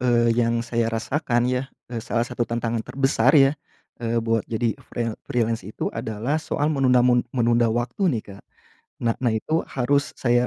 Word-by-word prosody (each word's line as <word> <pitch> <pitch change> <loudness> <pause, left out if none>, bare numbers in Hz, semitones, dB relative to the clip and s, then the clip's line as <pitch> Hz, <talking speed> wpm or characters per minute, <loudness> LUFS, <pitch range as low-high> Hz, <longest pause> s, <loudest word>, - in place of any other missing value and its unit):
eee, 120 -2 +3
yang 115 0 +1
saya 115 -1 0
rasakan 120 +2 0
ya, 125 +2 -1 0.2
eee, 115 - -2
salah 115 +1 -1
satu 120 -1 -3
tantangan 115 -1 -1
terbesar 135 +2 +2
ya, 135 -1 +6 0.5
eee, 115 0 -1
buat 115 -1 +2
jadi 115 0 0 0.2
freel 115 -2 -2 0.2
freelance 115 -4 -1
itu - - -4
adalah 115 +8 -2
soal 150 0 -1
menunamun 125 -3 +4 0.2
menunda 120 -1 +3
waktu 120 - 0
nih, 120 -9 0
Kak. 100 - -13 0.6
Nah, 115 -1 +2
nah 120 -3 +1
itu 155 +9 -1
harus, 140 +3 0
saya, 120 0 +2
120 Hz, 165 wpm, -23 LUFS, 115-130 Hz, 0.6 s, ya